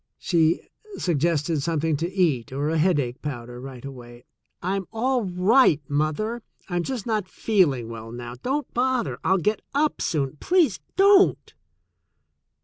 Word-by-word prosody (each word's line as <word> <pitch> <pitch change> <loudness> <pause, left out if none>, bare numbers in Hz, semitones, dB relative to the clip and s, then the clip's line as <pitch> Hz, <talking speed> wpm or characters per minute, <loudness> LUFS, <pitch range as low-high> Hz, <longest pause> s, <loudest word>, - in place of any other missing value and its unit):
She 165 -2 +2 0.4
suggested 165 -2 0
something 160 0 0
to 170 +4 -3
eat 155 - +1
or 140 +3 -1
a 165 - +1
headache 145 -7 +1
powder 120 -4 -6
right 130 -1 -9
away. 120 -2 -10 0.3
"I'm 190 +1 -2
all 245 +1 0
right, 185 - +4
mother. 155 +11 -1 0.3
I'm 175 -3 -1
just 245 +2 -4
not 215 -5 -1
feeling 160 - +1
well 115 0 -8
now. 120 0 -7
Don't 275 +1 -2
bother. 255 -1 0
I'll 190 - +3
get 210 +4 0
up 300 +1 +1
soon. 145 -2 -1
Please 350 - +2 0.2
don't." 395 0 +4
170 Hz, 140 wpm, -24 LUFS, 135-220 Hz, 0.4 s, right